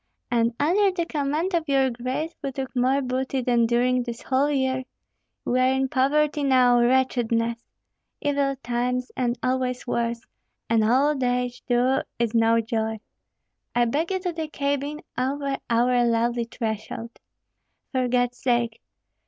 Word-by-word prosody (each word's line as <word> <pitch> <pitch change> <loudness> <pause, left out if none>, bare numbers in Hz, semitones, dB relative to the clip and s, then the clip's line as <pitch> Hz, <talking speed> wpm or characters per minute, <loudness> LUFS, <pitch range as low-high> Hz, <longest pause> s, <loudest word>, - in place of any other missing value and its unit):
And 235 0 +2
under 380 +7 +3
the 360 -3 -2
command 310 +4 -1
of 325 -3 0
your 270 -2 +3
grace 255 +7 -3
we 275 - -3
took 265 0 -5
more 260 +3 +2
booty 260 +1 -1
than 235 -1 +3
during 250 +2 +2
this 240 -1 -6
whole 270 +2 +1
year. 260 -2 0 0.6
We 250 - +1
are 255 +1 +4
in 265 0 0
poverty 290 +3 +2
now, 250 -3 +5
wretchedness! 235 -2 +1 0.6
Evil 280 -1 0
times, 245 +1 -1
and 245 -1 0
always 255 -1 -1
worse; 235 -1 -1 0.5
and 225 -1 +4
old 265 +5 +2
age, 245 0 -1
too, 250 +2 +3 0.2
is 235 -1 0
no 230 0 +4
joy. 220 -1 -2 0.8
I 240 0 +4
beg 295 +8 -1
you 380 -1 -1
to 360 -2 -2
the 320 -1 -4
cabin, 285 0 -2 0.2
over 275 +1 -1
our 245 +1 +3
lowly 235 0 +1
threshold. 230 +1 -5 0.7
For 255 -2 0
God's 245 0 0
sake! 240 -2 0
255 Hz, 145 wpm, -24 LUFS, 240-275 Hz, 0.8 s, now